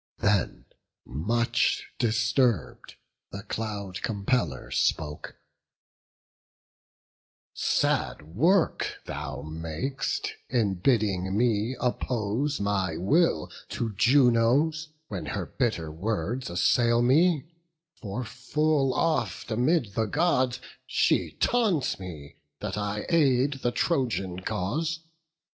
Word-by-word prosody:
Then, 100 -2 0 0.4
much 115 - 0
disturb'd, 115 - +1 0.4
the 100 0 -7
Cloud 100 -3 -4
compeller 100 - -1
spoke: 75 -1 -1 2.2
"Sad - - 0
work 160 - +1
thou 70 -1 -5
mak'st, 80 - -3 0.2
in 105 -7 +1
bidding 100 -5 +1
me 115 +1 +1
oppose 125 +3 -1
My 95 -5 0
will 100 - +2 0.2
to 115 -2 -3
Juno's, 130 +6 +3 0.2
when 90 -7 -5
her - - -3
bitter 105 - -2
words 110 +8 -2
Assail 120 +7 +3
me; 150 +3 +4 0.5
for 110 +1 -5
full 135 +4 0
oft 155 -6 0
amid 125 - +1
the 110 +1 +1
Gods 130 -3 +1 0.3
She - - +1
taunts 200 - +1
me, 80 -7 -9 0.2
that - - -4
I 105 0 -3
aid 140 -4 +3
the 120 - +1
Trojan 115 - 0
cause. 155 - -2
115 Hz, 95 wpm, -27 LUFS, 95-135 Hz, 2.2 s, me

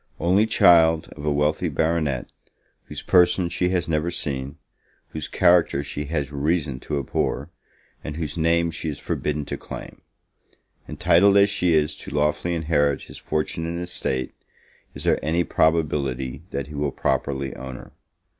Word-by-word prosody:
Only 95 +6 +3
child 80 -6 +5
of 75 - -9
a 75 - +2
wealthy 75 +4 +1
Baronet, 75 -3 0 0.6
whose - - -7
person 90 0 +4
she 85 +1 0
has 90 -2 0
never 80 +1 0
seen, 70 -5 -3 0.5
whose 80 -2 -5
character 85 -5 +3
she 75 +1 -5
has 75 -2 -2
reason 75 -2 -1
to 75 - -3
abhor, 70 +3 -2 0.5
and 75 - -5
whose 80 -3 -4
name 85 0 +2
she 80 0 -4
is 75 - -4
forbidden 75 -1 -2
to - - -4
claim; - - -9 0.9
entitled 100 +4 +4
as 100 0 +5
she 90 -5 +2
is 75 -1 +1
to - - -9
lawfully 75 +4 0
inherit 75 -3 +1
his - - -11
fortune 80 +1 -2
and 85 +1 -3
estate, 85 -7 -3 0.6
is - - -6
there - - +1
any 85 +3 +1
probability 70 -6 0
that 70 - -3
he 75 - -11
will 75 0 -1
properly 65 0 -1
own 65 -1 -7
her? - - -11
80 Hz, 155 wpm, -23 LUFS, 70-85 Hz, 0.9 s, child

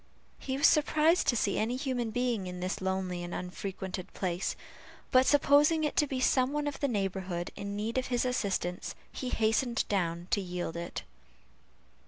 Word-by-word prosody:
He 265 -1 -3
was 285 - +3
surprised 310 +3 +4
to 240 - +4
see 205 -3 +1
any 230 +3 0
human 255 -3 -1
being 235 -4 -1
in 180 0 -6
this 185 +2 -3
lonely 190 -1 -1
and 175 0 -5
unfrequented 185 0 -5
place, 180 -1 -1 0.6
but 255 0 +5
supposing 295 +2 +5
it 300 - 0
to 295 - +4
be 265 -1 -2
some 255 +1 +3
one 295 0 -1
of 285 -2 -3
the 280 - +1
neighborhood 190 -5 -2
in 200 0 -5
need 225 +4 -1
of 260 - -4
his 245 0 0
assistance, 195 -7 -1 0.2
he 255 - -4
hastened 225 +1 +1
down 175 -3 -1
to 200 - +2
yield 180 -2 -4
it. 170 0 -5
220 Hz, 175 wpm, -30 LUFS, 185-260 Hz, 0.6 s, but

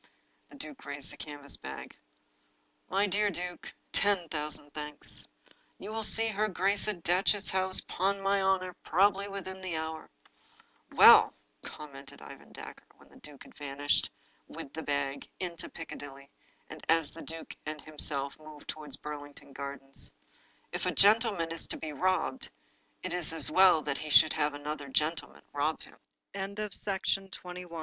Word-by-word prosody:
The - - -14
duke 285 0 -8
raised 145 -1 -4
the - - -12
canvas 145 -2 -3
bag. - - -8 0.9
"My 195 +2 +3
dear 205 +1 +2
duke, 180 -1 -5 0.2
ten 195 -4 +2
thousand 150 -1 -4
thanks! 150 -1 -6 0.5
You 205 - -7
shall 225 0 -2
see 225 +1 +3
her 215 0 +1
grace 195 +1 +2
at 190 -6 -3
Datchet 190 +3 +3
House, 190 0 +3
'pon 195 +2 0
my 195 0 +2
honor, 190 -1 +2
probably 195 +3 +3
within 190 -1 -6
the 180 -4 -3
hour." 160 0 -4 0.4
" - - -31
Well," - - +9 0.3
commented 140 -2 -10
Ivor - - -11
Dacre, - - -10
when - - -20
the - - -17
stranger 145 -2 -11
had - - -16
vanished, 145 0 +1 0.4
with 135 - -8
the 160 - -4
bag, 140 -2 -2
into 175 -1 -4
Piccadilly, 140 -3 -9 0.4
and - - -10
as 165 -2 +3
the 165 - -8
duke 165 0 -6
and 155 0 -4
himself 145 -2 -1
moved 155 -1 -12
toward 150 -3 -5
Burlington 145 -2 -8
Gardens, 140 0 -4 0.3
" - - -34
if - - -2
a - - +2
gen 210 +3 +7
tleman 195 -8 -1
is 165 - -1
to - - -2
be 155 -1 -5
robbed, 185 - 0 0.5
it 185 - -3
is 180 -3 0
as 165 - +2
well 185 -5 +6
that 140 -2 -2
he 155 - -5
should 155 +1 +7
have 145 0 +1
165 Hz, 150 wpm, -31 LUFS, 145-190 Hz, 0.9 s, Well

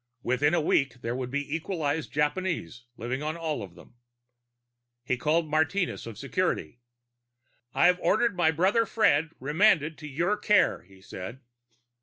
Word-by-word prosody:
Within 145 +7 +2
a - - +2
week, 135 -4 +1
there 115 +1 -2
would 130 -1 -4
be 145 +2 -2
equalized 160 -3 -2
Japanese 150 - -2
living 125 +4 -3
on 155 +2 -3
all 160 -5 -3
of 95 -4 -9
them. 105 +7 -17 1.1
He 130 - 0
called 155 +5 +1
Martinez 160 +1 0
of 110 -3 -8
security. 135 - -2 1.0
"I've 180 +1 +4
ordered 235 -4 +2
my 175 -3 +3
brother 190 +8 +2
Fred 160 -8 +2
remanded 155 +2 +2
to 150 - -8
your 170 +9 0
care," 210 0 +3
he 95 0 -20
said. 95 +8 -8
150 Hz, 145 wpm, -27 LUFS, 125-175 Hz, 1.1 s, I've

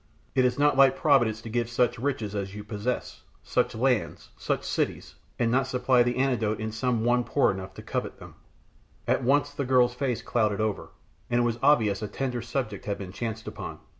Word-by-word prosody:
It 130 - +3
is 125 - +1
not 145 +1 +3
like 135 -1 +6
Providence 120 -8 +3
to 115 - -7
give 120 +1 -1
such 120 -1 +1
riches 115 -6 -2
as 100 -1 -4
you 105 - -6
possess, 105 +4 -4 0.2
such - - 0
lands, 125 -1 0
such - - -2
cities, - - -2 0.2
and 115 -1 +1
not 130 +2 +2
to - - -9
supply 125 0 +3
the 120 +1 +1
antidote 120 -5 +1
in 110 0 -3
some 115 0 -1
one 120 0 +3
poor 140 - +2
enough 95 0 -7
to - - -9
covet - - -3
them." - - -12 0.7
At - - +1
once 145 +3 +2
the 145 - -3
girl's 125 -2 +3
face 125 -2 -2
clouded 105 -3 0
over, 110 -2 -2 0.4
and 120 0 +2
it - - +3
was 120 0 -1
obvious 115 -9 +3
a 105 - -3
tender 125 +2 -3
subject 120 -4 -4
had 100 -1 -2
been 95 -2 -7
chanced 110 +1 -5
upon. - - -6
120 Hz, 205 wpm, -27 LUFS, 110-130 Hz, 0.7 s, like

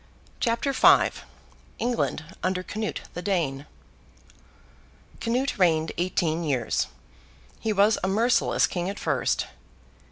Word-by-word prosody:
CHAPTER 235 +3 0
V - - +6 0.7
ENGLAND 235 -9 -1 0.2
UNDER 185 0 -1
CANUTE 215 +3 -4
THE 175 - -5
DANE 160 -7 -1 1.5
Canute 250 +1 -1
reigned 160 -3 +3
eighteen 170 -2 0
years. 130 -7 0 0.7
He 220 - -1
was 205 +1 +3
a - - +2
merciless 225 +6 +3
King 175 0 -3
at 200 - -5
first. - - 0
190 Hz, 105 wpm, -26 LUFS, 165-225 Hz, 1.5 s, V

